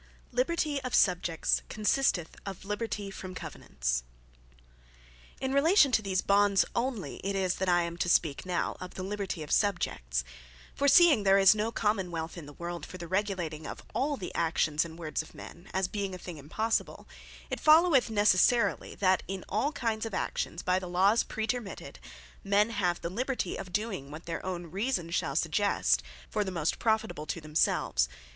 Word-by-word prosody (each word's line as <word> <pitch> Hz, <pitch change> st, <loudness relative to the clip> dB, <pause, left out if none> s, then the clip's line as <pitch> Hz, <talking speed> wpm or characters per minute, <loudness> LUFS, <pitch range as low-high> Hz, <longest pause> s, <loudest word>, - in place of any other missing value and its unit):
Liberty 285 Hz, +3 st, 0 dB
Of 255 Hz, -1 st, -2 dB
Subjects 175 Hz, -3 st, +2 dB
Consisteth 210 Hz, -5 st, +1 dB
In 195 Hz, -, -3 dB
Liberty 205 Hz, 0 st, -3 dB
From 185 Hz, -1 st, -8 dB
Covenants -, -, -3 dB, 1.4 s
In 265 Hz, 0 st, -2 dB
relation 290 Hz, 0 st, +5 dB
to 225 Hz, -, +3 dB
these 190 Hz, -2 st, -1 dB
Bonds 200 Hz, 0 st, +4 dB
only 235 Hz, -4 st, -2 dB
it 195 Hz, +1 st, -3 dB
is, 185 Hz, -2 st, +1 dB
that 190 Hz, -1 st, 0 dB
I 175 Hz, -1 st, +4 dB
am 170 Hz, 0 st, -5 dB
to 175 Hz, -, -1 dB
speak 155 Hz, -4 st, +2 dB
now, 180 Hz, -2 st, -2 dB
of 185 Hz, -, -8 dB
the 185 Hz, -, -5 dB
Liberty 195 Hz, -4 st, -3 dB
of 150 Hz, -, -9 dB
Subjects. 60 Hz, -, 0 dB, 0.5 s
For 280 Hz, -, 0 dB
seeing 315 Hz, -5 st, +7 dB
there 195 Hz, -1 st, +5 dB
is 195 Hz, 0 st, +7 dB
no 215 Hz, +1 st, -1 dB
Common 210 Hz, -5 st, 0 dB
wealth 165 Hz, -1 st, -5 dB
in 165 Hz, -5 st, -9 dB
the 145 Hz, -, -11 dB
world, 170 Hz, 0 st, -6 dB
for 185 Hz, -, -8 dB
the 170 Hz, -1 st, -7 dB
regulating 180 Hz, -5 st, -2 dB
of -, -, -8 dB
all 285 Hz, +1 st, 0 dB
the 185 Hz, -, -6 dB
actions, 155 Hz, -2 st, +1 dB
and 165 Hz, -1 st, -9 dB
words 155 Hz, -3 st, -3 dB
of 160 Hz, -, -14 dB
men, 170 Hz, +2 st, -11 dB
(as 190 Hz, -1 st, 0 dB
being 195 Hz, -1 st, -3 dB
a -, -, -7 dB
thing 175 Hz, -2 st, -8 dB
impossible:) 215 Hz, +11 st, -2 dB, 0.4 s
it -, -, -2 dB
followeth 310 Hz, -5 st, +5 dB
necessarily, 210 Hz, +2 st, +3 dB
that 185 Hz, -1 st, +2 dB
in 190 Hz, -1 st, -5 dB
all 225 Hz, +9 st, 0 dB
kinds 225 Hz, -6 st, -2 dB
of 210 Hz, -, -5 dB
actions, 170 Hz, -, -3 dB
by 185 Hz, 0 st, +2 dB
the 185 Hz, -1 st, -7 dB
laws 195 Hz, +6 st, +3 dB
praetermitted, 220 Hz, -1 st, -4 dB, 0.4 s
men 205 Hz, +3 st, +3 dB
have 180 Hz, -5 st, 0 dB
the 170 Hz, -, -4 dB
Liberty, 250 Hz, -2 st, -2 dB
of 190 Hz, -2 st, -7 dB
doing 195 Hz, -9 st, -3 dB
what 155 Hz, +3 st, -9 dB
their 165 Hz, -1 st, -4 dB
own 175 Hz, -3 st, -5 dB
reasons 190 Hz, -4 st, -2 dB
shall -, -, -1 dB
suggest, -, -, +2 dB, 0.3 s
for 210 Hz, -, -1 dB
the 195 Hz, -, -4 dB
most 170 Hz, -4 st, -1 dB
profitable 220 Hz, -8 st, 0 dB
to 170 Hz, -, -3 dB
themselves. 150 Hz, -, +1 dB
190 Hz, 180 wpm, -30 LUFS, 170-220 Hz, 1.4 s, seeing